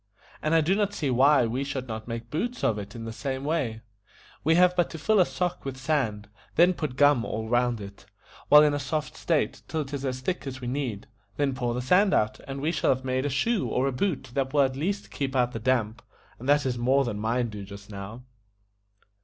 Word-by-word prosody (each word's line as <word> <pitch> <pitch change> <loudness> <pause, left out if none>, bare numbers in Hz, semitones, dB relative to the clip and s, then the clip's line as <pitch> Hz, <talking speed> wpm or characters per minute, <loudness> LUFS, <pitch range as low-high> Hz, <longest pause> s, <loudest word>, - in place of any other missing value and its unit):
"And 155 +1 +1
I 165 - +5
do 165 +5 +2
not 205 0 0
see 145 -4 -1
why 135 +1 +5
we 125 +4 -2
should 135 -2 -4
not 110 -1 -6
make 115 0 -6
boots 240 +10 -3
of 105 -2 +2
it 105 +2 -8
in 115 -1 -6
the 115 - -5
same 130 +3 -4
way. 140 -8 -1 0.6
We 160 +2 +4
have 180 +1 +5
but 175 -1 +2
to 165 - -7
fill 205 +7 +2
a 180 - +5
sock 180 -1 -2
with 135 -1 -5
sand, 130 -7 -1 0.3
then 175 +3 +5
put 155 -7 -4
gum 145 -3 +4
all 110 0 -4
round 120 0 +1
it, 100 0 -11 0.4
while 150 +1 +9
in 150 -1 +3
a 145 - -1
soft 145 +2 -3
state, - - 0
till 160 - -2
it 145 -1 -7
is 140 -1 -3
as 130 -1 -3
thick 160 +1 -3
as 130 -1 -5
we 125 - -6
need, 125 -6 -3 0.3
then 140 -2 +1
pour 120 -2 -2
the 125 - -2
sand 190 +9 +4
out, 110 0 +1
and 135 0 -5
we 155 +3 +1
shall 155 - 0
have 130 +1 -10
made 130 +2 0
a - - -1
shoe 205 - 0
or 130 +2 0
a - - +1
boot 135 -2 -2
that 135 -1 -1
will 145 - +6
at 130 -1 +1
least 190 +9 -3
keep 135 -2 -3
out 125 -1 +2
the 115 - -5
damp, 115 -2 0 0.4
and 130 +4 -5
that 145 0 +4
is 125 -2 -1
more 135 +3 +3
than 105 -4 -3
mine 120 +2 0
do 105 -2 -7
just 100 +1 -11
now." 105 +5 -8
130 Hz, 240 wpm, -27 LUFS, 120-150 Hz, 0.6 s, while